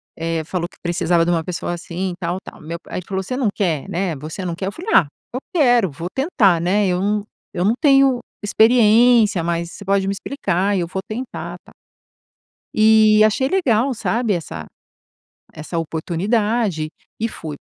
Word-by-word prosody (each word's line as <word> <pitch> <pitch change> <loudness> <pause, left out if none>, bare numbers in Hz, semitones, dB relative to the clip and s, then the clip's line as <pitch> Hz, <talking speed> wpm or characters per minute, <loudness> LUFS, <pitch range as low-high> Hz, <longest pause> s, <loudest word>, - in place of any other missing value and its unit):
Eh, 165 0 -2
falou 175 +2 -3
que - - -22
precisava 170 -1 +1
de 175 - +1
uma 165 -1 +1
pessoa 175 0 -4
assim 175 +2 -4
e - - -5
tal, 175 0 -2
tal. - - -12
Meu 165 +2 -6
pa - - -18
aí - - -2
ele 180 - -10
falou: 190 -1 -2
"Você 255 - -4
não 255 -3 0
quer, 165 -8 -1
né, 175 -2 -1
você 155 +7 -7
não 170 - -2
quer?" 190 +3 -4
Eu - - -2
falei: 360 - -6
"Ah, 165 - +6 0.3
eu 255 - -2
quero. 245 - +4
Vou 165 +5 -6
tentar, 215 - +2
né. 195 +3 +2
Eu 180 0 0
não 205 +1 0 0.3
eu 180 +1 0
não 220 - +4
tenho 275 -4 +4 0.2
experiência, 225 -2 +4
mas 170 0 -2
você 200 - -11
pode 195 0 +1
me - - +1
explicar 200 - -1
e 180 - 0
eu 170 - -2
vou 190 +2 -4
tentar." 245 +4 -6
Tal. - - -17 1.0
E 215 0 +6
achei 215 +5 +2
legal, 270 - +1
sabe, 230 -1 0
essa 85 - -5 0.9
essa 155 +2 -5
oportunidade 180 +3 -1 0.3
e 225 - 0
fui. 155 -8 -7
195 Hz, 190 wpm, -20 LUFS, 170-225 Hz, 1.0 s, Ah